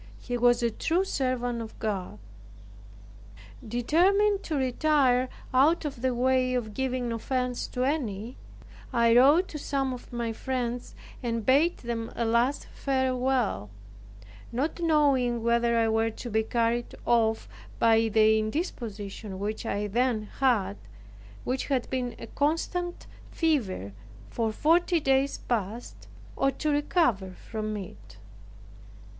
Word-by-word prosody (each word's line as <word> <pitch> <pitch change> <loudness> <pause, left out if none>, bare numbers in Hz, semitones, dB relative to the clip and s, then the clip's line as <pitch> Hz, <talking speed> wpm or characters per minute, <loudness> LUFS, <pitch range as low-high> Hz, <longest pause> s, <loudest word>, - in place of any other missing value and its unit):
He 245 - -5
was 240 0 +3
a 235 - +2
true 335 - 0
servant 255 -7 -1
of 225 -1 -9
God. 195 - -3 1.5
Determined 380 - +2
to 315 - -2
retire 260 -1 +2 0.2
out 300 +6 +4
of 275 -5 -5
the 255 -1 0
way 255 0 +2
of 220 -4 -3
giving 255 -1 -2
offense 250 +2 -2
to 250 - -2
any, 245 -5 -2 0.6
I 235 -2 +4
wrote 290 +9 +6
to 300 - -6
some 270 -2 -1
of 250 - -10
my 235 -1 -2
friends, 245 0 -3 0.3
and 230 -3 -2
bade 295 +7 +4
them 230 -1 -4
a 235 - -1
last 235 +5 +1
farewell; 260 - 0 0.8
not 275 +9 -2
knowing 280 -8 +2
whether 235 0 +2
I 225 -1 +3
were 225 0 +2
to 230 +2 -8
be 220 +1 +2
carried 235 +1 -1
off 225 -2 +2 0.3
by 225 0 +4
the 220 0 +4
indisposition 215 - -4
which 215 +3 -4
I 205 0 -1
then 230 +1 0 0.2
had, 235 - +2 0.7
which 255 +1 -2
had 265 -4 0
been 250 -2 -2
a - - -8
constant 330 +6 -2 0.2
fever 215 - -1 0.4
for 225 -1 -1
forty 335 - +3
days 270 -1 +1
past, 225 0 -4 0.3
or 275 - +2
to 300 +3 -2
recover 290 - +1
from 215 +2 -5
it. 190 -3 -10
245 Hz, 130 wpm, -27 LUFS, 225-275 Hz, 1.5 s, wrote